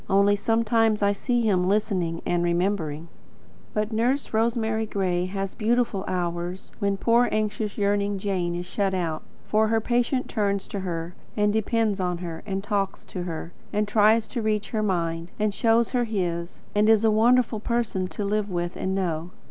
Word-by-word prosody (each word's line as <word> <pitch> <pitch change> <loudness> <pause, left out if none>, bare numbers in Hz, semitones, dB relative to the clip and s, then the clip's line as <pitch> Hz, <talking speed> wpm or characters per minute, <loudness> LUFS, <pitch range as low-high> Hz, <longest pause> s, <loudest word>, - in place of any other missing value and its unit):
Only, 200 +1 +4
sometimes 225 0 +2
I 200 - +4
see 240 +4 0
him 185 -4 +2
listening 195 -5 0
and 175 0 +1
remembering. 170 -3 0 0.7
But 210 +1 0
Nurse 245 +6 0
Rosemary 220 -1 +1
Gray 185 -3 0
has 195 0 -3
beautiful 225 -3 +1
hours 175 0 -3
when 200 -2 0
poor 235 +3 +3
anxious, 215 -1 -1
yearning 205 0 +1
Jane 185 -3 -1
is 175 +1 -4
shut 195 +1 -1
out. 165 -4 -2 0.2
For 220 +1 +2
her 225 +1 +2
patient 245 +3 0
turns 200 -3 -1
to 200 - -4
her, 170 -2 -4 0.2
and 210 0 +3
depends 220 -1 +1
on 180 -1 0
her, 170 -2 -6
and 195 -1 -2
talks 200 -2 -2
to 180 - -6
her, 165 0 -5 0.2
and 210 0 0
tries 215 +1 +4
to 240 - -3
reach 215 -1 -1
her 220 - 0
mind, 170 -4 -1
and 210 -1 0
shows 230 +2 +2
her 245 -2 +1
his, 175 -5 -3
and 210 +1 +3
is 225 0 +5
a 220 - +5
wonderful 230 +1 +3
person 220 -5 -1
to 205 +2 -4
live 210 0 0
with 175 -1 -2
and 190 0 -2
know. 170 -3 -1
205 Hz, 175 wpm, -25 LUFS, 180-220 Hz, 0.7 s, is